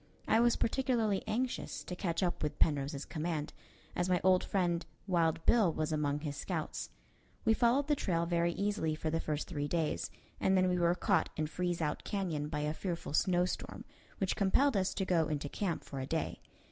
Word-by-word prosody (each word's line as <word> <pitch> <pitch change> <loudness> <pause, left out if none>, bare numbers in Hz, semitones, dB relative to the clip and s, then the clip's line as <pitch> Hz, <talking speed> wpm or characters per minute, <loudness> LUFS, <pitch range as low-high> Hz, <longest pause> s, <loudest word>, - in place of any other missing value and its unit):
I 220 - +4
was 240 0 +4
particularly 230 -5 +1
anxious 240 +4 -2
to 180 - -5
catch 175 0 -1
up 175 - -1
with 150 -1 -2
Penrose's 140 -2 +1
command, 155 -2 -3 0.4
as 180 +1 0
my 180 -1 +3
old 185 0 +5
friend 175 -3 0 0.2
Wild 165 -3 +1
Bill 215 -8 +5
was 155 0 -2
among 150 -1 0
his 145 -2 -4
scouts. - - -3 0.6
We 225 - +5
followed 245 +5 +3
the 295 - +3
trail 170 -9 0
very 170 0 +1
easily 200 -6 0
for 155 0 -2
the 165 - +1
first 150 -2 -2
three 145 -5 -2
days, 155 - -1 0.3
and 190 0 +3
then 185 0 +4
we 180 0 +1
were 170 0 +3
caught - - +2
in 155 - +1
Freeze 175 +1 -2
Out 150 -1 -2
Canyon 175 -8 -2
by 150 -1 -2
a 150 +1 0
fearful 170 -3 -4
snowstorm, 180 +2 0 0.3
which 190 -2 0
compelled 225 +7 +3
us 190 -1 +1
to 190 - 0
go 165 -4 +2
into 145 -1 -2
camp 175 +3 -2
for 140 - -6
a 130 - -4
day. 160 +1 -2
175 Hz, 195 wpm, -33 LUFS, 155-195 Hz, 0.6 s, old